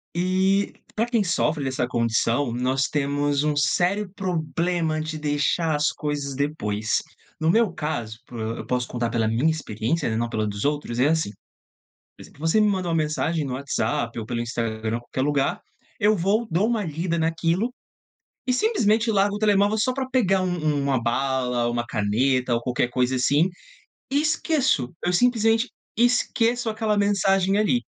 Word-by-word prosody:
Eh, 190 Hz, +3 st, +1 dB, 0.2 s
pra 225 Hz, -, +1 dB
quem 235 Hz, -3 st, +1 dB
sofre 160 Hz, -4 st, 0 dB
dessa 130 Hz, -2 st, -1 dB
condição, 115 Hz, +2 st, +1 dB
nós 130 Hz, +3 st, 0 dB
temos 145 Hz, 0 st, 0 dB
um 150 Hz, -1 st, +1 dB
sério 180 Hz, +8 st, +1 dB
problema 170 Hz, -3 st, -1 dB
de 155 Hz, 0 st, -4 dB
deixar 150 Hz, +2 st, 0 dB
as 150 Hz, +1 st, +2 dB
coisas 145 Hz, -2 st, -3 dB
depois. 110 Hz, -7 st, -1 dB, 0.4 s
No 160 Hz, -, +1 dB
meu 225 Hz, +2 st, +3 dB
caso, 120 Hz, -9 st, -4 dB
por 120 Hz, -, -9 dB
eu 110 Hz, +1 st, -4 dB
posso 125 Hz, -1 st, -1 dB
contar 120 Hz, -1 st, -2 dB
pela 115 Hz, -2 st, 0 dB
minha 120 Hz, +8 st, +2 dB
experiência, 150 Hz, -1 st, -1 dB
na 110 Hz, -, -1 dB
não 120 Hz, +1 st, -1 dB
pela 110 Hz, -2 st, -1 dB
dos 100 Hz, +1 st, -3 dB
outros, 145 Hz, -5 st, -1 dB
é 130 Hz, -, +4 dB
assim. 160 Hz, -5 st, +1 dB, 0.9 s
Por -, -, -12 dB
exemplo, -, -, -16 dB
você 165 Hz, +6 st, +2 dB
me 210 Hz, -, +4 dB
mandou 185 Hz, -3 st, -1 dB
uma 165 Hz, -, +1 dB
mensagem 155 Hz, 0 st, 0 dB
no 135 Hz, -, -4 dB
WhatsApp 135 Hz, -2 st, -2 dB
ou 110 Hz, -, -3 dB
pelo 115 Hz, +1 st, -3 dB
Instagram, 115 Hz, -1 st, -2 dB
qualquer 120 Hz, +2 st, -6 dB
lugar, 140 Hz, -1 st, 0 dB, 0.4 s
eu 215 Hz, 0 st, +4 dB
vou 200 Hz, +6 st, +1 dB
dou 175 Hz, +6 st, +2 dB
uma 230 Hz, -2 st, 0 dB
lida 165 Hz, +1 st, -2 dB
naquilo 165 Hz, +7 st, 0 dB, 0.8 s
e 255 Hz, -, +1 dB
simplesmente 230 Hz, -, +2 dB
largo 200 Hz, -1 st, +2 dB
o -, -, -4 dB
telemóvel 205 Hz, 0 st, +3 dB
só 255 Hz, +4 st, +1 dB
pra 265 Hz, 0 st, -3 dB
pegar 195 Hz, -7 st, +2 dB
um 185 Hz, -, 0 dB, 0.2 s
um 145 Hz, -2 st, +1 dB
uma 135 Hz, -3 st, +1 dB
bala, 125 Hz, 0 st, 0 dB
uma 120 Hz, 0 st, -2 dB
caneta 125 Hz, +4 st, +1 dB
ou 115 Hz, -, 0 dB
qualquer 125 Hz, 0 st, 0 dB
coisa 125 Hz, +1 st, 0 dB
assim 145 Hz, +7 st, +3 dB, 0.6 s
e 285 Hz, +2 st, +3 dB
esqueço. 290 Hz, -, +1 dB
Eu 175 Hz, -, +1 dB
simplesmente 225 Hz, +3 st, +3 dB, 0.3 s
esqueço 240 Hz, 0 st, +2 dB
aquela 215 Hz, -1 st, 0 dB
mensagem, 195 Hz, -1 st, +2 dB
ali. 215 Hz, +4 st, +2 dB
155 Hz, 170 wpm, -24 LUFS, 125-200 Hz, 0.9 s, é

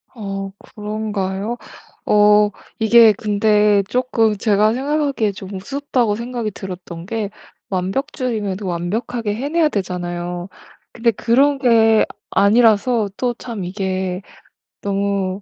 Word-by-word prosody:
어 195 Hz, -3 st, -5 dB, 0.2 s
그런가요? 210 Hz, 0 st, -3 dB, 0.5 s
어 210 Hz, 0 st, +5 dB, 0.3 s
이게 225 Hz, 0 st, +7 dB
근데 210 Hz, 0 st, +2 dB
쪼끔 235 Hz, -4 st, +1 dB
제가 210 Hz, +1 st, +3 dB
생각하기에 275 Hz, -4 st, 0 dB
좀 195 Hz, 0 st, -9 dB
우습다고 245 Hz, +1 st, -1 dB
생각이 235 Hz, -1 st, -4 dB
들었던 180 Hz, -3 st, -8 dB
게 215 Hz, 0 st, -3 dB, 0.4 s
완벽주의면 205 Hz, +1 st, -2 dB
완벽하게 205 Hz, +5 st, -2 dB
해내야 300 Hz, +6 st, +1 dB
되잖아요. 175 Hz, -3 st, -4 dB, 0.5 s
근데 235 Hz, 0 st, +2 dB
그런 270 Hz, +6 st, +2 dB
게 225 Hz, -4 st, +4 dB, 0.3 s
아니라서 220 Hz, +1 st, +3 dB
또 245 Hz, -1 st, 0 dB
참 230 Hz, -5 st, -6 dB
이게 185 Hz, -1 st, -3 dB, 0.6 s
너무 200 Hz, -1 st, -1 dB
210 Hz, 240 characters per minute, -19 LUFS, 195-235 Hz, 0.6 s, 이게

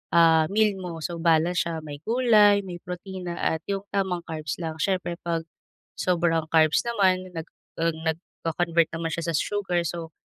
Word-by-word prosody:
ah, 165 Hz, -2 st, +6 dB
meal 205 Hz, 0 st, +2 dB
mo. 170 Hz, -3 st, -6 dB
So, 170 Hz, +1 st, -4 dB
balance 165 Hz, +1 st, +3 dB
siya, 165 Hz, -2 st, -4 dB
may 145 Hz, -2 st, -8 dB
gulay, 215 Hz, -4 st, +5 dB
may 180 Hz, -2 st, -7 dB
protina 180 Hz, 0 st, -6 dB
at 160 Hz, -, 0 dB
yung 195 Hz, -1 st, -2 dB
tamang 190 Hz, -3 st, -1 dB
carbs 155 Hz, -3 st, -4 dB
lang. 160 Hz, -1 st, -4 dB
Siyempre 180 Hz, -2 st, -1 dB
'pag 165 Hz, -1 st, -2 dB, 0.6 s
sobrang 165 Hz, -3 st, +1 dB
carbs 160 Hz, -1 st, +4 dB
naman 185 Hz, -5 st, +1 dB
nag 165 Hz, 0 st, -5 dB, 0.3 s
ah, 165 Hz, -, +3 dB
nagko-convert 165 Hz, +1 st, -1 dB
naman 165 Hz, 0 st, -3 dB
siya 170 Hz, +1 st, -3 dB
sa -, -, +1 dB
sugar, 180 Hz, 0 st, 0 dB
so 165 Hz, -1 st, -5 dB
170 Hz, 165 wpm, -25 LUFS, 165-185 Hz, 0.6 s, ah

